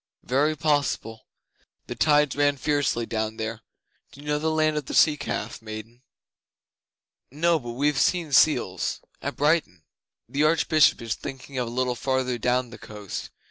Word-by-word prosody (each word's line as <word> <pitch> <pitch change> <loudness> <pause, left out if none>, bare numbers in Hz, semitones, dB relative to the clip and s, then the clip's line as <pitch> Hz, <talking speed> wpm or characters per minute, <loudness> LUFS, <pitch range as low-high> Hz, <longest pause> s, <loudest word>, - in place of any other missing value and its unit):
'Very 145 +5 +1
possible. 145 -7 -1 0.6
The - - -5
tides 150 -2 +3
ran 145 0 +2
fiercely 140 -4 0
down 110 0 -3
there. 110 0 -4 0.5
Do 130 - -15
you 145 - -12
know 150 0 0
the 160 +1 0
land 155 -1 +1
of 150 -3 -3
the - - -4
Sea 155 -2 +5
calf, 115 -6 -4
maiden?' 110 +2 -9 1.3
'No 165 +4 +2
but 120 -3 -7
we've 145 +3 +1
seen 170 -4 +1
seals 120 - +2 0.2
at - - -4
Brighton.' 145 - +1 0.4
'The 140 +5 -2
Archbishop 155 -4 +3
is 115 -1 -1
thinking 135 0 -7
of 125 - -1
a - - -5
little 125 +1 0
farther 130 -1 -1
down 125 +1 0
the - - -11
coast. 105 -2 -7
135 Hz, 160 wpm, -25 LUFS, 115-150 Hz, 1.3 s, Sea